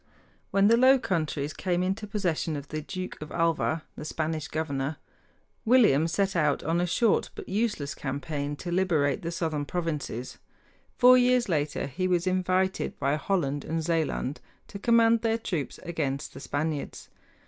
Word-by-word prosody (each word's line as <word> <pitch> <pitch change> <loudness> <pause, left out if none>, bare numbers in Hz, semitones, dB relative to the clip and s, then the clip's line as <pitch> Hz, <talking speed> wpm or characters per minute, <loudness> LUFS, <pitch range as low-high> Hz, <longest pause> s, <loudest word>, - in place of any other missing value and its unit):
When 200 0 +4
the 230 +2 +5
Low 260 +2 +6
Countries 155 - -2
came 180 +2 -1
into 195 +3 -2
possession 175 -6 -1
of 145 -1 -7
the 155 0 -3
Duke 185 +3 -6
of 155 - -7
Alva, 165 -1 0
the - - -7
Spanish 155 0 -3
governor, 145 -2 -2 0.7
William 215 - +5
set 195 +3 0
out 150 -4 +1
on 165 +2 +1
a 180 - 0
short 225 +5 +2
but - - -8
useless 205 -9 -1
campaign 145 +1 -4
to 175 +4 -6
liberate 170 -6 +1
the 170 - -3
southern 160 -3 -2
provinces. 150 -7 -4 0.6
Four 250 +1 +7
years 250 -2 +3
later 150 -3 0
he 140 +7 -2
was 175 -1 +1
invited 185 0 0
by 140 +1 +1
Holland 145 -3 -1
and 165 0 -2
Zealand 160 -4 -1 0.3
to 200 - -7
command 230 0 +4
their 225 -1 +1
troops 180 -10 -4
against 150 -5 -3
the - - -9
Spaniards. 145 0 -3
165 Hz, 160 wpm, -27 LUFS, 150-195 Hz, 0.7 s, Four